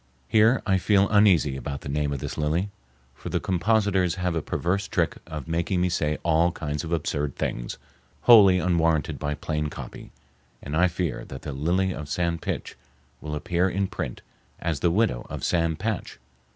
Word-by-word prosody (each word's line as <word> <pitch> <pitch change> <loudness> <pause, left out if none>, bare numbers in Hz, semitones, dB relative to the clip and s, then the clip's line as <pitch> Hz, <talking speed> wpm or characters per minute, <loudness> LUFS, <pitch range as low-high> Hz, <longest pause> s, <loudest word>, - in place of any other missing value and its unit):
Here 110 - +4
I 95 -3 +2
feel 100 +1 +3
uneasy 95 -10 +4
about 70 +1 -5
the - - -8
name 75 +1 -1
of 70 - -2
this - - -5
lily, 80 +7 -1 0.4
for - - -8
the - - 0
compositors 95 -1 +1
have 90 -1 -1
a 80 - -1
perverse 95 +6 -1
trick - - 0
of 80 -3 -6
making 85 +3 0
me 90 +1 +2
say 75 -3 0
all 85 +1 +3
kinds 75 -3 -4
of 80 - -6
absurd 75 -4 -1
things - - -3 0.4
wholly 100 -6 +8
unwarranted 85 -3 +1
by 75 0 -2
plain 75 0 -2
copy, - - -9 0.5
and 70 +2 -5
I 90 +3 +4
fear 85 -4 -3
that 65 - -9
the 75 - -4
"Lily 90 +7 0
of 75 -1 -7
San 85 0 -1
Pitch" - - -4 0.5
will 75 0 -4
appear 85 +5 0
in 100 +2 0
print 65 -9 -5 0.4
as 80 -4 -2
the 85 - +2
widow 85 - +1
of - - -6
Sam 85 -2 +1
Patch. 105 +4 -3
85 Hz, 180 wpm, -25 LUFS, 75-95 Hz, 0.5 s, wholly